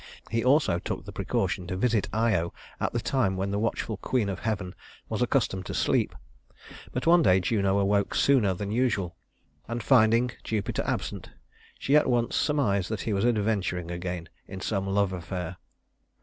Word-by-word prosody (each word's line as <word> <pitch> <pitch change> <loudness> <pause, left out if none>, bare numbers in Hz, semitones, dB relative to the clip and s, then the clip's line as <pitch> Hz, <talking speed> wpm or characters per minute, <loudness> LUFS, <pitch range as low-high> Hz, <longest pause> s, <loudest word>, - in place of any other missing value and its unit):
He 115 0 +1
also 130 - +3
took - - -5
the - - -7
precaution 90 - -2
to 90 0 -3
visit 110 0 +1
Io 105 -6 +1 0.3
at - - 0
the 120 - -1
time 110 -6 0
when 95 +1 -1
the 100 - 0
watchful 110 -1 -2
queen 110 -1 0
of 95 - -4
heaven 100 -5 -2 0.4
was - - -2
accustomed 95 -1 0
to - - -4
sleep; - - +1 0.8
but 125 - -3
one 170 +1 +6
day 95 - +5
Juno 100 +1 +1
awoke 100 0 +1
sooner 115 -9 +3
than 100 +2 -4
usual, 110 -7 0 0.5
and 115 0 -3
finding 120 -1 +4
Jupiter 105 -3 -2
absent, - - -3 0.5
she 140 - +1
at 150 - +4
once 120 -1 +1
surmised 110 - +1
that 110 -3 -3
he 110 - -2
was 100 +3 +1
adventuring 100 -6 0
again 85 -1 -4 0.2
in 95 - -7
some 95 0 -2
love 100 -1 +1
affair. 90 0 -5
100 Hz, 170 wpm, -27 LUFS, 95-115 Hz, 0.8 s, one